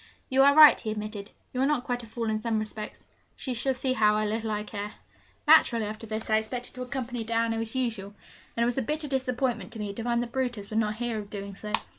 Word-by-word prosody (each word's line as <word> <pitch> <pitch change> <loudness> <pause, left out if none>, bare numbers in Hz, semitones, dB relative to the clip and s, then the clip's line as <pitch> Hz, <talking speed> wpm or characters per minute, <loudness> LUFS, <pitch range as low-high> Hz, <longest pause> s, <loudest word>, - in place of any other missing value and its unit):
'You 265 +1 +4
are 280 +1 +6
right,' 305 -1 +9
he 220 - -4
admitted; 210 -1 -5 0.2
'you 255 - -1
are - - +4
not 295 -4 +1
quite 245 -2 -2
a 230 - -11
fool 230 +1 -4
in 215 - 0
some 225 0 -1
respects. 215 0 -5 0.3
She 260 - -4
shall 260 +3 0
see 255 +1 0
how 210 -3 +3
little 220 +1 -2
I 210 -1 -1
care!' 205 0 -6 0.5
Naturally, 245 -8 +6
after 215 +2 -6
this, 220 +1 -4
I 215 - +4
expected 245 +3 -4
to 255 - -8
accompany 250 -2 -4
Diana 230 0 0
as 225 +2 -3
usual, 220 -6 -2 0.4
and 235 - +3
it - - +3
was 245 +2 0
a - - +1
bitter 300 +5 -2
disappointment 255 -5 -1
to 225 - -7
me 205 -1 -3
to 230 - -5
find 240 0 +1
that 235 - -7
Brutus 245 -6 -2
would 220 - +1
not 215 -1 0
hear 235 -1 -2
of 205 -1 -8
doing 200 -1 -6
so. 210 +2 -7
230 Hz, 245 wpm, -28 LUFS, 215-250 Hz, 0.5 s, right